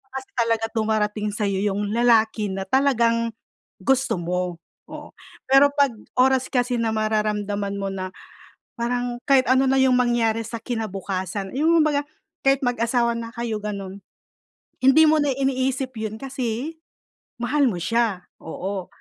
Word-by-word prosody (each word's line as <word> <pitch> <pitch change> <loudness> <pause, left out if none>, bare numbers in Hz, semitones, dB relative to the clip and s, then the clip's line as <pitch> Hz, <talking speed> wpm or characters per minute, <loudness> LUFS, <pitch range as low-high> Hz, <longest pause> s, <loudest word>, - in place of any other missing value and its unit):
kasi 265 0 -6
talaga 230 -1 +1
dumarating 215 -1 0
sayo 200 -2 -1
yung 205 0 -1
lalaki 225 -2 +3
na 190 0 -3
talagang 235 -4 +2 0.5
gusto 270 -3 +1
mo, 180 +1 -2 0.3
oo. - - -9 0.4
Pero 270 +2 +6
pag 280 -2 +3 0.3
oras 260 0 +3
kasi 245 -1 0
na 225 -1 0
mararamdaman 210 -2 -1
mo 195 - -2
na 185 -1 -4 0.7
parang 245 +1 -2
kahit 270 -2 +4
ano 260 +2 +4
na 270 0 +3
yung 260 -1 +4
mangyari 235 -2 +1
sa 230 +1 -6
kinabukasan 195 -4 -4
yung 325 +4 +3
baga 290 -1 +1 0.4
kahit 270 0 +4
mag-asawa 235 -1 +1
na 230 0 -6
kayo 235 -2 -3
ganun, 200 -2 -6 0.8
hindi 270 +5 +6
mo 315 - +4
na 285 -2 +1
iniisip 265 0 -1
yun 220 -1 -4
kasi 265 +3 -4 0.6
mahal 285 +4 +1
mo 190 - -3
siya, 220 -3 0 0.2
oo. 190 +3 -5
230 Hz, 140 wpm, -23 LUFS, 210-260 Hz, 0.8 s, Pero